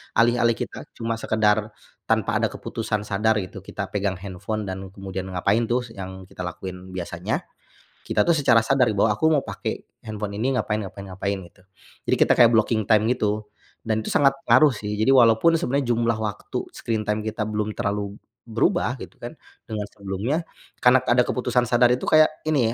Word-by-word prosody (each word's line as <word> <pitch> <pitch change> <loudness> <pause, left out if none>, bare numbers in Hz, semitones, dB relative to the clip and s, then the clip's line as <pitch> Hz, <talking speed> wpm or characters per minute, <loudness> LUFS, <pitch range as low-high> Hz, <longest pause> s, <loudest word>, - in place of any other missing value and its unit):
alih-alih 120 0 +3
kita - - -6
cuma 115 0 -3
sekedar 110 -1 +2 0.4
tanpa - - +1
ada - - +2
keputusan 105 -2 -3
sadar 105 +2 +1
itu 90 +2 -9
kita 100 0 -6
pegang 100 -2 -1
handphone 100 +3 -5
dan 95 0 -5
kemudian 95 -1 -6
ngapain, 100 +5 +1
tuh, 125 +1 +1
s 120 - -12
yang 95 -2 -8
kita 90 - -10
lakuin 95 +1 -8
biasanya, 90 -2 -3 0.6
kita, - - +1
tuh, 170 - +4
secara 135 -7 +4
sadari 125 -6 +2
bahwa 105 +1 +3
aku 105 - -1
mo 150 -3 +4
pake - - -5 0.2
handphone 105 -2 -5
ini 130 +2 +1
ngapain 105 -3 -1
ngapain 100 0 -8
ngapain 100 +2 -2
gitu. 90 +1 -16 0.4
Jadi - - +2
kita - - +4
kayak 120 -2 +8
blocking 110 -1 +2
time 110 0 +5
gitu. 105 -3 0 0.4
Dan, 110 -1 0
tuh, - - -5
sangat 140 -1 +4 0.2
ngaruh, 150 -4 +6
sih. 105 -1 -5
Jadi 110 +5 +2
walaupun 120 +5 +5
sebenarnya 140 -6 +1
jumlah 115 -1 +1
waktu 105 -2 -4
screen 110 -2 -3
time 105 0 0
kita 110 -1 -2
belum 105 0 -2
terlalu 100 -2 -2 0.3
berubah 125 - +1
gitu, - - -10
kan, 120 +5 -7 0.3
dengan 105 -2 -5
sebelumnya. 100 - -3 0.4
Karna 125 +1 +5
ada 120 0 +3
keputusan 125 -1 0
sadar 120 +1 +4
itu 125 +1 0
kayak, 155 0 +6 0.2
ini 130 -7 +2
110 Hz, 180 wpm, -24 LUFS, 100-120 Hz, 0.6 s, kayak